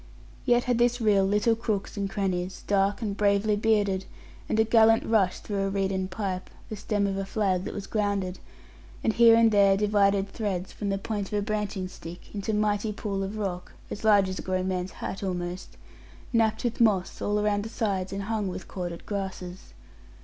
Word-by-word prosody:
Yet 245 -1 +4
had 245 -2 0
this 245 +1 +3
rill 205 -4 +3
little 210 +3 +2
crooks 220 -3 -3
and 200 -1 -2
crannies 190 -2 -2
dark 200 +2 +1
and 205 -2 -2
bravely 205 +1 +2
bearded, 205 -3 +1 0.4
and 220 - +1
a - - +6
gallant 225 0 +5
rush 200 -5 +2
through 195 -2 -2
a - - -1
reeden 195 -1 -1
pipe 190 -1 -4 0.2
the 215 - -4
stem 205 0 -1
of 195 -1 -1
a 195 - -1
flag 190 -2 0
that - - -4
was 200 - -5
grounded; 200 -3 -1 0.6
and 220 - +2
here 230 0 +7
and 230 -1 +5
there 200 -2 +5
divided 200 -1 +2
threads, 195 -5 -3
from 205 - -4
the 195 - 0
points 205 -1 -4
of 210 - 0
a 205 - 0
branching 210 -3 -2
stick, 175 -1 -11
into 205 +1 -2
mighty 210 0 +1
pools 200 -2 -3
of 205 +3 -6
rock 185 -4 -4 0.2
(as 205 - -6
large 205 -3 +5
as 185 0 -4
a - - -3
grown 185 0 -1
man's 185 0 -3
hat 195 - -5
almost) 180 -1 -4 0.6
napped 220 -1 +2
with 240 -1 -1
moss 200 -5 +2
all 205 0 +1
around 210 -1 +1
the 220 - -6
sides 195 -5 -2
and 195 0 -3
hung 215 -1 -1
with 185 - -6
corded 175 -2 -6
grasses. 190 -3 -6
200 Hz, 195 wpm, -27 LUFS, 190-215 Hz, 0.6 s, here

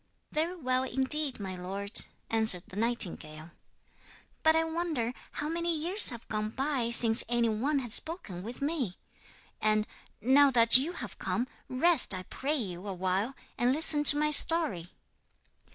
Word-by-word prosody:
'Very 325 +4 -3
well 255 -6 -2
indeed, 265 +2 +2
my 190 -2 -7
lord,' 195 +3 -4 0.3
answered 220 -6 -1
the - - -14
nightingale; 175 -8 -1 0.9
'but 315 0 +2
I 325 - +1
wonder 320 -8 -4 0.2
how 295 - -6
many 335 +1 -3
years 355 +7 +3
have 235 -2 -10
gone 215 0 -4
by 260 0 -4
since 230 -1 +7
any 240 -1 0
one 260 +8 -2
has 245 -5 -3
spoken 315 - -4
with 235 +7 -9
me. 280 - -4 0.7
And, 215 0 0 0.3
now 275 +4 +3
that 230 -3 +4
you 285 +7 +2
have 230 - -10
come, 190 +7 -4 0.2
rest, 270 - +2
I 185 - -7
pray 280 +10 -4
you, 195 - -6
awhile, 190 +6 -4 0.2
and 245 +1 +1
listen 295 +1 +6
to 290 - +8
my 300 0 -1
story.' 295 - +3
245 Hz, 150 wpm, -27 LUFS, 210-300 Hz, 0.9 s, to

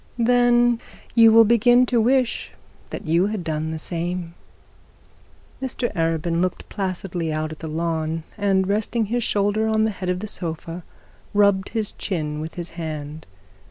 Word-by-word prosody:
'Then 240 0 +4 0.3
you 230 -1 +7
will 225 +1 +8
begin 240 +3 +5
to 240 -2 +2
wish 255 +1 +1 0.4
that - - -7
you 170 +4 +3
had 210 -3 -3
done 155 -1 -2
the 160 - -3
same.' 170 +1 -3 1.3
Mr 255 -2 -2
Arabin 165 -1 0
look 185 -1 -2
placidly 185 -4 -3
out 155 0 -2
at 155 - -9
the 160 - -6
lawn, 160 0 -2
and 195 -2 +1
resting 215 +3 0
his 240 +3 -1
shoulder 205 +2 +1
on 220 0 +2
the 220 - +1
head 185 -2 -5
of 180 0 0
the 210 - -5
sofa, 170 -3 -5 0.5
rubbed 200 -2 +3
his 220 -2 -2
chin 150 -6 -3
with 160 +1 -6
his 175 -1 -6
hand. 155 -2 -6
190 Hz, 160 wpm, -23 LUFS, 165-220 Hz, 1.3 s, will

